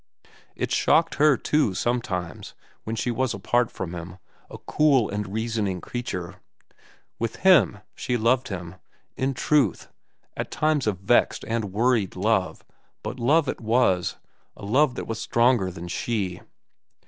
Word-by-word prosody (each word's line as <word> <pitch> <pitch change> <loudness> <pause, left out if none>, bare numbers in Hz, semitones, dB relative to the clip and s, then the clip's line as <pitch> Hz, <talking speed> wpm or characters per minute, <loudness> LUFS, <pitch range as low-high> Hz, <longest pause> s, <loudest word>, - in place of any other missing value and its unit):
It - - -3
shocked - - +3
her, 150 -4 +6
too, 145 -10 +1
sometimes, 95 -8 -3 0.3
when 110 - -3
she 120 +2 -1
was 120 0 -1
apart 120 -1 +1
from 90 -2 -6
him, 85 +1 -8 0.3
a - - -9
cool 140 -7 +2
and 100 -1 -4
reasoning 110 -4 -2
creature. 90 -6 -5 0.8
With 115 0 -2
him, 170 - +5
she 125 - -2
loved 120 +3 +2
him—in 95 +8 -6
truth, 150 +2 +1 0.5
at - - -4
times 155 -5 0
a 105 - +2
vexed 95 +6 +1
and 115 -1 -1
worried 105 0 +1
love; 100 0 0 0.4
but 130 - -5
love 145 +6 +3
it - - -3
was, 110 -6 +2 0.4
a - - -9
love 130 +5 +2
that - - -5
was 115 -1 -4
stronger 120 -5 +2
than 85 -1 -8
she. 95 -1 -2
115 Hz, 140 wpm, -25 LUFS, 95-125 Hz, 0.8 s, her